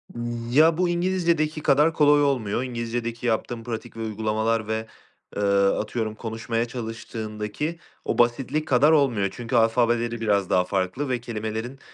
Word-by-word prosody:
Iıı, 120 0 -4
ya, 160 +3 +5
bu 180 -1 +2
İngilizcedeki 170 -3 0
kadar 150 +3 +4
kolay 145 -1 +5
olmuyor, 125 -4 0
İngilizcedeki 120 -1 -4
yaptığım 115 +1 -1
pratik 115 -1 -6
ve 115 - -5
uygulamalar 110 0 -1
ve, 110 0 -2 0.5
eee, 105 - -2 0.2
atıyorum 110 +2 -1
konuşmaya 115 +1 -3
çalıştığındaki 115 +4 -5 0.3
o - - -1
basitlik 130 +6 +1
kadar 140 +4 +4
olmuyor. 125 -10 +3
Çünkü 120 +1 -4
alfabeleri 120 0 +2
biraz 100 -4 +1
daha 90 - +3
farklı 95 +9 -2
ve 125 -1 0
kelimelerin, 110 +3 -5
120 Hz, 140 wpm, -24 LUFS, 110-140 Hz, 0.5 s, ya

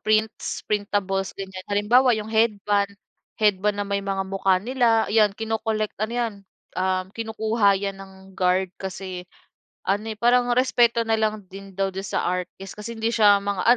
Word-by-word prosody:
prints, 215 0 0
printables, 200 -2 -1
ganyan. 190 -1 -7
Halimbawa 235 +5 +4
yung 215 0 -5
headband, 205 -2 +1 0.5
headband 210 -1 +2
na - - -1
may 200 0 0
mga 195 -1 -1
mukha 195 -1 +2
nila 235 0 +2
'yan 215 -2 +4
kino-collect, 220 -1 -2
ano 220 +2 -1
'yan, 235 -3 -1 0.4
um, 185 0 0
kinukuha 220 -2 +1
'yan 200 -1 -3
ng 195 0 -11 0.2
guard 185 +1 +2
kasi 185 -1 -6 0.6
ano, 205 +3 0
eh, 215 - -6
parang 245 +2 +3
respeto 235 -2 +3
na 225 - +2
lang 215 -1 0
din 195 +1 -10
daw 195 0 0
do'n 190 - -4
sa - - -1
artist 180 +1 -4
kasi 230 +3 -6
hindi 225 +1 0
siya 205 -2 +6
mga 200 -2 -2
205 Hz, 160 wpm, -24 LUFS, 195-225 Hz, 0.6 s, siya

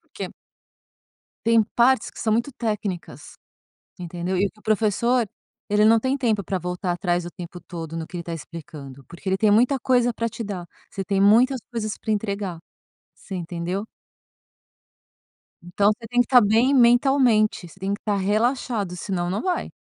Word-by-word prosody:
porque - - -7 1.2
tem 230 -1 +5
partes 245 0 +4
que - - -15
são 220 -2 +1
muito 235 +5 +1
técnicas, 210 -6 -4 0.6
entendeu? 175 +1 -3
E 200 +2 +2
o - - -5
que 215 - -28
o - - -25
professor, 225 +3 +2 0.4
ele 210 +1 +3
não 225 +1 +6
tem 260 +3 0
tempo 225 -6 0
para 190 0 -2
voltar 180 +1 -3
atrás 175 0 -1
o 175 - -6
tempo 175 0 -9
todo 165 -1 -7
no 160 -1 -4
que 180 - -9
ele 170 - -4
está 170 - -6
explicando, 150 -5 -10
porque 170 - -9
ele 190 - +2
tem 215 +1 +3
muita 245 +6 +4
coisa 245 -1 +2
para 230 +1 -2
te 230 - -6
dar. 195 -5 -5 0.2
Você 195 - -5
tem 195 0 0
muitas 240 +6 +5
coisas 215 -3 -3
para 220 - -2
entregar. 200 -4 -2 0.6
Você 195 - -10
entendeu? 175 +3 -3 1.8
Então, 200 +4 +2
você 230 +1 -10
tem 245 0 +2
que - - +3
estar 250 -2 +7
bem 225 +5 +3
mentalmente. 240 -5 +4
Você 190 - -18
tem 195 +1 -1
que - - -8
estar 210 -2 -1
relaxado, 210 -1 0
senão 175 -1 -2
não 190 +3 -2
vai. 365 -1 -1
205 Hz, 180 wpm, -23 LUFS, 180-235 Hz, 1.8 s, estar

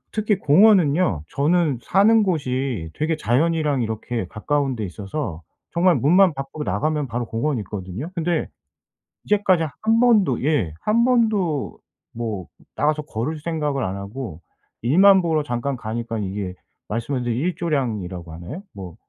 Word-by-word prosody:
특히 215 -2 +1
공원은요, 160 - +4
저는 150 -2 +1
사는 210 - +4
곳이 130 - -2
되게 160 +2 -1
자연이랑 150 +2 +1
이렇게 110 -2 -3
가까운 135 +6 -1
데 110 - -4
있어서 95 - -5 0.3
정말 175 +1 +3
문만 180 +4 +4
밖으로 135 +2 -5
나가면 150 +7 0
바로 120 0 -3
공원이 115 +2 -1
있거든요. 100 - -6
근데 170 -1 -1 0.8
이제까지 195 -5 +3 0.2
1 225 +1 +3
번도 210 - +3
예 140 - +1
1 225 +2 +3
번도 215 - +1 0.3
뭐 110 -6 -4 0.3
나가서 150 +1 +1
걸을 145 +3 -3
생각을 150 -5 -2
안 95 +1 -3
하고 100 -4 -7 0.4
일만 190 +9 +6
보러 160 -3 +1
잠깐 135 0 -2
가니까 115 -1 -4
이게 95 -2 -4 0.3
말씀한 120 +4 -2
이제 120 - -1
일조량이라고 120 - -2
하나요? 90 - -8
뭐 95 -4 -9
140 Hz, 300 characters per minute, -22 LUFS, 110-170 Hz, 0.8 s, 일만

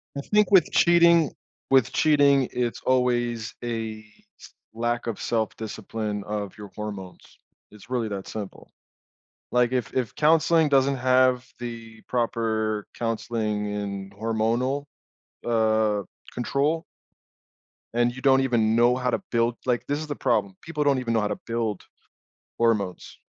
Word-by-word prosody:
I 140 - -3
think 210 +3 +2
with 185 -7 +5
cheating 170 -2 +5 0.4
with 135 -4 +4
cheating, 140 -4 +4
it's 120 -2 -2
always 120 -3 0
a 110 -2 -4 0.3
s - - -14 0.2
lack 120 +1 -2
of 115 - -3
self-discipline 110 -1 -3
of 105 -1 -5
your 105 -1 -9
hormones. 100 -4 -8 0.3
It's 105 +2 -16
really 125 -3 -1
that 100 -2 -5
simple. 105 -3 -8 0.8
Like, 125 -1 +3
if 125 -1 -1
If 125 -3 -1
counseling 160 +1 +4
doesn't 135 0 +3
have 130 0 +3
the 115 -2 -8
proper 110 -3 -1
counseling 110 -2 -2
and 100 -1 -5
hormonal, 115 +6 -1 0.6
uh, 110 -2 +2 0.3
control 145 +6 0 1.1
and 120 +1 +2
you 130 - -8
don't 135 0 +5
even 115 -4 +2
know 120 +1 +4
how 125 -1 -1
to - - -1
build 115 0 +1
like, 125 -2 0
this 145 +1 -1
is 155 - -6
the 145 - -4
problem, 115 -8 0
people 150 -2 -3
don't 140 -2 +3
even 115 -2 -2
know 110 - +2
how 105 - 0
to 105 - -3
build 115 -4 -2 0.8
hormones. 105 -6 0
120 Hz, 140 wpm, -25 LUFS, 110-130 Hz, 1.1 s, with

